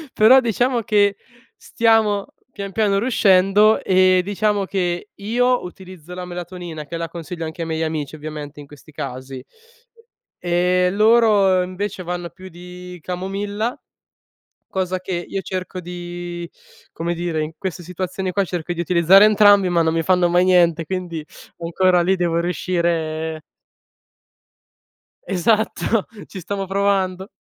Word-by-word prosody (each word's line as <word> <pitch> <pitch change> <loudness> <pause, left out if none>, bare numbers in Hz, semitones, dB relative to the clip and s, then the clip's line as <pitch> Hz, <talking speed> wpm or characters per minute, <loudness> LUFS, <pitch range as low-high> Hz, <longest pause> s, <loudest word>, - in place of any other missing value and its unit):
però 235 +5 +7
diciamo 240 +1 0
che 205 -2 +2 0.4
stiamo, 220 -3 +1 0.2
pian 200 -3 -6
piano, 200 -1 +1
riuscendo 205 -2 +4
e, 185 -1 +4
diciamo, 205 +1 0
che 180 0 -2
io 245 +4 +1
utilizzo 180 -2 -11
la 180 0 -6
melatonina 175 -3 -7
che 165 - -6
la 165 0 -3
consiglio 165 0 -6
anche 160 +2 -7
ai 165 - -3
miei 160 0 -2
amici, 155 -2 -3
ovviamente, 150 -1 -8
in 145 - -11
questi 150 +2 -16
casi; 130 -2 -7 1.0
e 180 +1 +2
loro, 210 -3 +4
invece, 185 +1 -5
vanno 175 0 -4
più 185 +3 -13
di 180 +1 -11
camomilla 200 +6 -3 0.9
cosa 185 -1 -2
che 180 -1 -4
io 195 - -3
cerco 185 -1 -5
di, 175 0 -7 0.4
come 170 +1 -3
dire, 170 -2 -2
in 155 +1 -4
queste 185 -3 -5
situazioni 185 +2 -4
qua 200 +2 +1
cerco 175 -2 -4
di 170 - -3
utilizzare 180 +3 +6
entrambi, 205 -2 +5
ma 170 -1 +2
non 160 0 +1
mi 165 0 0
fanno 180 +1 +3
mai 175 +1 +3
niente 170 -3 +3
quindi, 175 -3 -4 0.3
ancora, 175 +2 +2
lì 190 +2 +2
devo 170 -2 0
riuscire 165 -2 -2 1.8
Esatto! 215 +3 +1 0.2
Ci 195 - -8
stamo 195 +2 -4
provando. 195 -1 0
180 Hz, 135 wpm, -20 LUFS, 170-200 Hz, 1.8 s, però